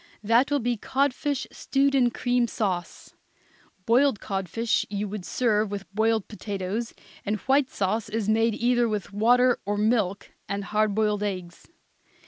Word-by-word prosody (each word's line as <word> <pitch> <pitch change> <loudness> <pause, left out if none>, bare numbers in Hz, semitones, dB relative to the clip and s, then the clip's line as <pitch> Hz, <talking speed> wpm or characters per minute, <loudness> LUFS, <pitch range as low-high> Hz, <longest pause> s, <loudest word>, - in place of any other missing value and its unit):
That 230 +5 +3
will 290 - +2
be 245 -2 -1
codfish 275 +3 -1
stewed 275 0 +1
in 255 -3 +4
cream 245 0 0
sauce. 185 -6 -3 0.7
Boiled 245 0 +3
codfish 195 +4 -1
you 205 0 -3
would 200 -2 -6
serve 215 -3 +1
with 200 -1 -7
boiled 220 0 +1
potatoes, 205 +1 -4 0.3
and 210 +1 -1
the - - -17
white 270 0 +3
sauce 205 +3 -1
is 215 -1 -2
made 225 0 +2
either 240 0 +2
with 210 -2 -4
water 245 +4 +4
or 205 +1 -2
milk 210 -3 0 0.2
and 200 0 -2
hard 210 +1 0
boiled 210 -1 +1
eggs. 185 -4 -5
220 Hz, 150 wpm, -26 LUFS, 200-245 Hz, 0.7 s, in